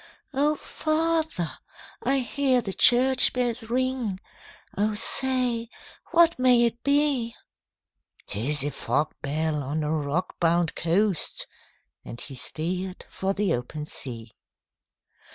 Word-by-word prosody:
'O 290 +3 +2
father! 315 - -1 0.4
I 275 - +1
hear 260 0 +1
the 200 -5 -4
church 255 +4 +6
bells 245 -1 -1
ring, 250 -5 -1 0.6
O 210 +1 0
say, 245 0 +1 0.4
what 335 -3 +4
may 250 -2 +5
it 235 0 -3
be?' 280 -5 +1 0.9
''Tis 135 +7 -1
a 145 - -2
fog 140 +3 -1
bell, 150 +1 -1
on 145 +3 -2
a 150 - -1
rock 155 +3 -2
bound 170 -1 +2
coast!' 180 +2 0 0.6
And 120 - -9
he 140 - -5
steer'd 180 +7 -4
for 190 +1 -1
the 195 -4 0
open 125 +5 -4
sea. 115 -6 -6
210 Hz, 115 wpm, -26 LUFS, 155-255 Hz, 0.9 s, church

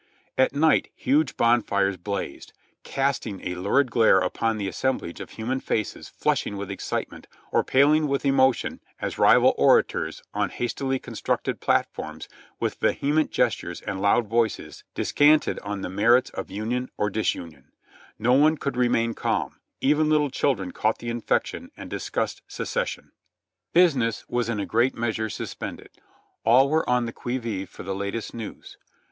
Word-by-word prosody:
At 130 +1 +2
night 155 +2 +3
huge 140 +2 +1
bon 120 +1 +4
fires 100 -2 0
blazed, 95 -4 -5 0.3
casting 135 -8 -2
a 90 - -2
lurid 105 +9 +1
glare 115 -4 +5
upon 110 +4 0
the 100 -2 -2
assemblage 95 -3 -2
of - - -7
human 125 +4 -3
faces 110 -5 -3
flushing 100 - -1
with 100 0 -5
excitement 100 - -4 0.2
or - - +3
paling 150 +3 +4
with 140 0 -1
emotion 135 -2 +2 0.2
as - - -4
rival - - +6
orators, - - +2
on - - 0
hastily 135 +2 -2
constructed - - -3
platforms, - - -1 0.3
with - - -2
vehement 150 +2 +1
gestures - - -1
and 95 -1 -5
loud 100 +4 +3
voices, 115 0 -1
descanted 150 +1 +3
on 100 -1 -5
the - - -3
merits 115 +7 +3
of - - -6
union 115 +5 -3
or 105 -1 0
disunion, 85 -9 -3 0.5
Xo 125 +5 +4
one 155 +1 +4
could 140 -3 -3
remain 115 -2 +2
calm, - - -2 0.2
even 150 +3 +3
little 150 -2 +2
children 110 -10 0
caught 110 +1 0
the 120 - -6
infection 120 -1 -1
and - - -9
discussed - - -3
"Secession." - - -3 0.6
Business 140 - +3
was 120 -1 -1
in 110 -3 -1
a 100 - -1
great 120 +4 +1
measure 110 -1 -2
suspended, - - -6 0.5
all 130 +5 +5
were 160 -3 +1
on 125 -1 +2
the 115 - -5
qui 120 +1 -3
vive 105 -6 -4
for - - -10
the 95 +1 -3
latest 100 +3 -4
news. 115 -3 -8
120 Hz, 155 wpm, -25 LUFS, 100-135 Hz, 0.6 s, rival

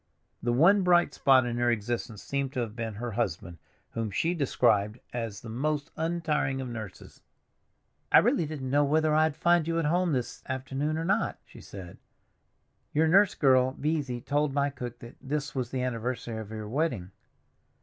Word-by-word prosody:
The 120 - 0
one 175 +11 +5
bright 175 -1 +3
spot 130 -3 +4
in 120 -1 -2
her 120 0 +2
existence 115 -1 -2
seemed 140 -1 -2
to 125 - -1
have 115 -2 -4
been 115 -3 -4
her 120 +2 -4
husband, 90 -6 -3 0.3
whom 115 -1 -3
she 165 - 0
described 110 - +1
as 115 -4 -4
the 115 - -9
most 145 +6 -2
untiring 160 -5 -1
of 130 - -4
nurses. 110 -5 -9 0.9
"I - - +8
really 160 - +3
didn't 135 -4 -5
know 145 +1 +4
whether 155 +2 +2
I'd 155 -1 +3
find 170 0 +3
you 165 0 0
at 165 - 0
home 175 +2 +1
this 125 -3 -3
afternoon 135 +4 -2
or 165 - -2
not," 190 - 0
she - - -14
said. 95 -3 -10 1.0
"Your 160 +2 +4
nurse 195 +4 +5
girl, 130 -2 +3
Beesy, 140 -5 -2
told 145 0 +1
my 140 0 +1
cook 125 -3 -7
that 120 - -11
this 145 +1 -3
was 125 -3 -2
the 130 -1 -2
anniversary 120 -1 -3
of 110 -2 -7
your 110 -1 -6
wedding. 115 - -1
130 Hz, 180 wpm, -28 LUFS, 120-155 Hz, 1.0 s, I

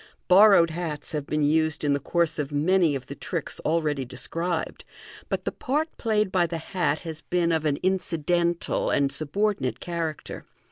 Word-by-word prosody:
Borrowed 185 -3 +7
hats 160 -3 -4
have 150 -3 -3
been 150 0 0
used 155 +1 +1
in 145 -1 +2
the 140 - 0
course 170 +2 0
of 145 -1 -2
many 160 +1 +2
of 130 -1 -5
the - - -7
tricks - - -4
already 155 -4 0
described, 160 +7 -3 0.5
but - - -2
the - - -1
part 305 +5 -2
played 215 -4 +1
by 180 -3 +2
the 165 - -4
hat 165 -2 -1
has 160 -2 -7
been 175 -1 0
of 160 -1 0
an 145 -2 +1
incidental 175 -2 0
and 140 -1 +2
subordinate 155 0 -1
character. 165 -3 -4
165 Hz, 170 wpm, -25 LUFS, 150-180 Hz, 0.5 s, Borrowed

